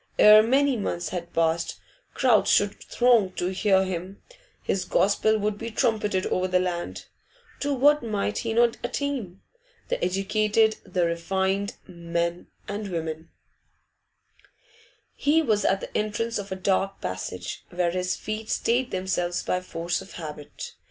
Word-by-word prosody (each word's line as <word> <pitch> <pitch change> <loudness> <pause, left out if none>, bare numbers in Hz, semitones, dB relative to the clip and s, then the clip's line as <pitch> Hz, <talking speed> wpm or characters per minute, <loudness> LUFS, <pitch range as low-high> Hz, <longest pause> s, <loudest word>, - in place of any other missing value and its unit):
Ere 215 0 +9
many 270 +4 +3
months 175 -4 -2
had 170 -2 -5
passed, 165 0 0 0.4
crowds 245 -5 +4
should 205 0 +2
throng 235 -6 +3
to 175 - -2
hear 190 0 +3
him; 185 +1 -5 0.4
his 190 - 0
gospel 205 +4 +2
would 210 0 -2
be 230 - -4
trumpeted 210 -4 0
over 185 0 0
the 180 0 +2
land. 175 -1 -3 0.5
To 285 0 0
what 290 +3 +4
might 210 -2 -2
he 230 - -2
not 235 +1 +3
attain? 240 -8 -3 0.5
The - - -1
educated, 215 +3 +2
the 180 -2 0
refined, 190 +4 -1
men 170 -1 -3 0.2
and 205 +1 -4
women 165 -2 -4 1.8
He 315 +3 +2
was 215 -7 +1
at 195 0 +2
the - - -8
entrance 215 +2 -1
of 200 -1 -7
a - - -1
dark 195 +1 0
passage, 90 0 -5
where 175 -1 0
his 180 +1 -1
feet 215 0 -5
stayed 245 +2 +1
themselves 185 -2 -1
by 180 - -1
force 170 0 -3
of 190 - -12
habit. 150 -3 -8
195 Hz, 145 wpm, -26 LUFS, 175-220 Hz, 1.8 s, Ere